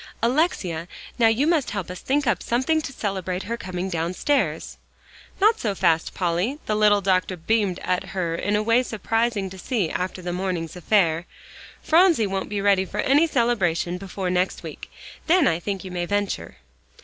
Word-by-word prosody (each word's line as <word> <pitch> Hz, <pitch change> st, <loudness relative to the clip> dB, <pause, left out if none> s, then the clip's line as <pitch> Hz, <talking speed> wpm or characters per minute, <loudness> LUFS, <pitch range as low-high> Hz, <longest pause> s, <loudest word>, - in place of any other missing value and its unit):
"Alexia, 230 Hz, -, 0 dB, 0.3 s
now 230 Hz, -, +6 dB
you 225 Hz, +6 st, +2 dB
must 320 Hz, -4 st, +2 dB
help 190 Hz, -4 st, -4 dB
us 180 Hz, -, -7 dB
think 285 Hz, +2 st, 0 dB
up 245 Hz, -, +1 dB
something 260 Hz, +7 st, +1 dB
to 285 Hz, -, -6 dB
celebrate 190 Hz, -6 st, -3 dB
her 230 Hz, +3 st, -3 dB
coming 185 Hz, -4 st, -4 dB
downstairs." 185 Hz, -, -1 dB, 0.6 s
"Not 430 Hz, +3 st, +4 dB
so 205 Hz, -4 st, -1 dB
fast, 165 Hz, -4 st, +1 dB
Polly." 180 Hz, +9 st, 0 dB
The 215 Hz, -, -1 dB
little 210 Hz, -1 st, +4 dB
doctor 185 Hz, -1 st, +1 dB
beamed 200 Hz, +1 st, 0 dB
at 185 Hz, +1 st, -1 dB
her 185 Hz, -3 st, -2 dB
in 205 Hz, +5 st, -1 dB
a 210 Hz, -, +1 dB
way 230 Hz, +3 st, +4 dB
surprising 225 Hz, -2 st, -1 dB
to 190 Hz, -, -10 dB
see 195 Hz, -4 st, -1 dB
after 185 Hz, 0 st, -3 dB
the 175 Hz, 0 st, -3 dB
morning's 180 Hz, -3 st, -3 dB
affair. 175 Hz, -3 st, +1 dB, 0.6 s
"Phronsie 330 Hz, -, +4 dB
won't 195 Hz, -1 st, -3 dB
be 205 Hz, -1 st, -2 dB
ready 195 Hz, -1 st, +3 dB
for 200 Hz, +2 st, -3 dB
any 290 Hz, +5 st, +4 dB
celebration 190 Hz, -, 0 dB
before 190 Hz, -1 st, -4 dB
next 180 Hz, +1 st, 0 dB
week. -, -, -9 dB, 0.4 s
Then 335 Hz, -3 st, +5 dB
I 165 Hz, -, +1 dB
think 195 Hz, +1 st, -4 dB
you 185 Hz, -, -8 dB
may 175 Hz, -1 st, -3 dB
venture." 205 Hz, -, -2 dB
195 Hz, 175 wpm, -24 LUFS, 180-235 Hz, 0.6 s, now